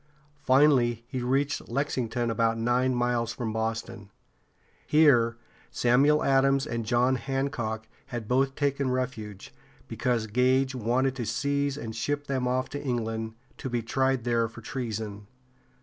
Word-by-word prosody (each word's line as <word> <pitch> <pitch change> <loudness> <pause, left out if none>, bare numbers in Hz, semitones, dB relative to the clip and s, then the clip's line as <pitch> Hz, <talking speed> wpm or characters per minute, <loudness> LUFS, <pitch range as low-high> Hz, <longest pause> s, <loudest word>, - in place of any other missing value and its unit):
Finally 130 -4 +3
he 130 0 -4
reached 135 +3 0
Lex´ing 130 -2 -1
ton, 120 0 -1
about 115 0 +1
nine 125 +2 +1
miles 120 -1 0
from 115 -3 -4
Boston. 110 -1 -3 0.8
Here 125 -7 +4 0.3
Samuel 140 +5 +3
Adams 135 0 +3
and 115 -2 -4
John 125 +2 +3
Hancock 120 -5 -3 0.2
had 120 -5 -5
both 135 +2 +1
taken 140 -2 0
refuge, 120 -6 -4 0.3
because 120 -3 -1
Gage 130 +4 +2
wanted 130 +2 0
to 120 - -3
seize 140 +3 0
and 110 -5 -6
ship 145 +5 -2
them 130 -3 -1
off 130 +1 0
to 145 - -5
England, 115 -3 -2 0.2
to 130 - -4
be 120 -2 -1
tried 130 +1 +1
there 115 -1 +1
for 115 0 -12
treason. 110 -4 -5
125 Hz, 140 wpm, -27 LUFS, 115-135 Hz, 0.8 s, Here